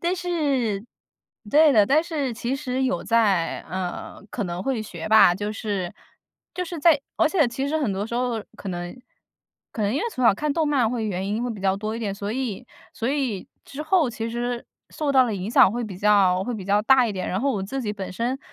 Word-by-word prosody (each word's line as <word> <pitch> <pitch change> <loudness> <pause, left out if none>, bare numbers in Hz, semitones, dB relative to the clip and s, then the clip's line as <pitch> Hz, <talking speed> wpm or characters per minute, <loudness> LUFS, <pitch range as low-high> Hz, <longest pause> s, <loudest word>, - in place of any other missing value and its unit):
但 350 +2 0
是 280 - 0 0.7
对 305 +3 +6
的， 215 -7 +5
但 290 +9 +3
是 295 -7 -2
其 240 +4 -2
实 265 -2 -2
有 260 0 -1
在 205 -7 +2
嗯， 185 +2 -5
可 220 - -3
能 175 0 -4
会 260 0 -1
学 175 -6 -7
吧。 215 -5 +6
就 205 +3 -3
是 200 -5 -3 0.6
就 360 - -2
是 340 -1 -6
在 310 0 +5 0.2
而 320 - +4
且 315 -5 +3
其 265 +4 -3
实 310 - 0
很 280 -10 0
多 195 +2 -2
时 235 - -6
候 240 -2 -1
可 195 - -6
能 175 +5 -6 0.7
可 220 - -4
能 205 0 +1
因 290 - 0
为 - - -1
从 255 - -2
小 230 - +6
看 300 +8 -2
动 315 +1 +1
漫 260 -6 +2
会 235 -2 -2
原 190 -1 -2
因 215 +3 -1
会 245 - -2
比 210 -4 -6
较 190 0 +1
多 215 +2 -3
一 - - -4
点， 205 -4 -3
所 200 +1 -4
以 245 -2 -4 0.3
所 230 - -3
以 260 -9 -2 0.2
之 285 +2 -6
后 315 -2 +3
其 230 -1 -4
实 240 0 -3 0.2
受 295 -2 -2
到 260 -2 +5
的 225 - -2
影 195 +2 -4
响 210 - +6
会 240 +3 -3
比 195 -4 -8
较 195 -3 +4
会 240 +5 -3
比 205 -4 -6
较 200 +2 +3
大 255 +2 +5
一 220 - -2
点。 185 -2 -4
然 185 - -1
后 275 +3 +1
我 200 - -2
自 265 +8 -4
己 210 -3 -2
本 195 -2 -6
身 240 +7 -2
230 Hz, 255 characters per minute, -24 LUFS, 200-270 Hz, 0.7 s, 对